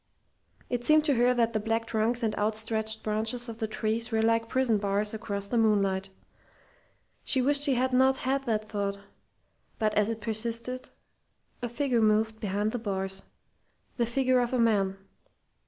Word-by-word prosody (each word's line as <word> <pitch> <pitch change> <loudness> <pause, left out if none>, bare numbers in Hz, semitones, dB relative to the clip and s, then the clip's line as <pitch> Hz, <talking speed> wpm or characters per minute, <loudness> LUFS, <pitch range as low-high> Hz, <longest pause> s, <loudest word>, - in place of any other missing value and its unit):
It 245 -1 -3
seemed 305 +3 +4
to 290 - +3
her 245 0 +3
that 230 -1 +1
the 215 - 0
black 225 +2 -1
trunks 230 +2 -1
and 220 -1 0
outstretched 220 +1 +3
branches 220 +3 -1
of 230 -1 -8
the 220 - -2
trees 220 +2 -2
were 220 0 +1
like 230 0 +1
prison 255 -5 +1
bars 205 +1 -1
across 200 -2 -4
the 235 +3 -1
moonlight. 195 -3 +1 1.1
She 265 - +2
wished 280 +2 +3
she 285 -3 +5
had 255 +1 0
not 265 +1 +4
had 270 +1 -2
that 215 -3 -1
thought, 200 -2 -3 0.8
but 215 -1 0
as 210 +1 +2
it 225 -1 -4
persisted, 230 +3 -4 0.7
a 240 - -3
figure 245 -1 0
moved 220 +1 +1
behind 205 +1 -1
the 245 - -3
bars, 195 -3 -3 0.8
the 235 -2 0
figure 255 +1 +1
of 245 +1 -1
a - - +2
man. 200 -4 +1
225 Hz, 170 wpm, -28 LUFS, 215-245 Hz, 1.1 s, she